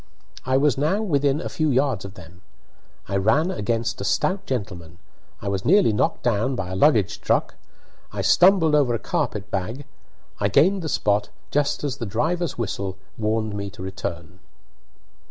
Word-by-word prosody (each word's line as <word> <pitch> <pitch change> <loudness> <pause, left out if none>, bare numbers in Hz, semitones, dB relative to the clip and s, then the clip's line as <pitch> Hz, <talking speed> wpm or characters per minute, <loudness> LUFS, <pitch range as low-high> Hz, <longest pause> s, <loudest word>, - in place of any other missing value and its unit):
I 130 0 +3
was 140 -1 +2
now 190 +9 +1
within 145 -6 +1
a - - -4
few 155 -1 -1
yards 130 -6 +1
of 100 0 -9
them. 90 0 -14 0.7
I 100 - -1
ran 140 - +2
against 115 - -2
a - - -2
stout 190 - 0
gentleman, 90 -9 -5 0.5
I - - -4
was 100 -1 -1
nearly 190 - +4
knocked 105 - 0
down 120 +2 +1
by 95 -6 -4
a - - -3
luggage 110 - +3
truck, - - +1 0.6
I - - -3
stumbled 180 -4 +5
over 140 -5 +3
a - - 0
carpet 105 -1 -3
bag; 110 +9 -3 0.5
I 100 - +2
gained 175 - +3
the 160 - -4
spot 105 -5 +1 0.2
just 145 0 0
as 140 -2 -2
the 115 - -4
driver's 165 - -1
whistle 100 -4 -3 0.2
warned 110 -1 -1
me 100 -1 -4
to 95 -1 -10
return. 90 -2 -6
115 Hz, 170 wpm, -23 LUFS, 100-145 Hz, 0.7 s, stumbled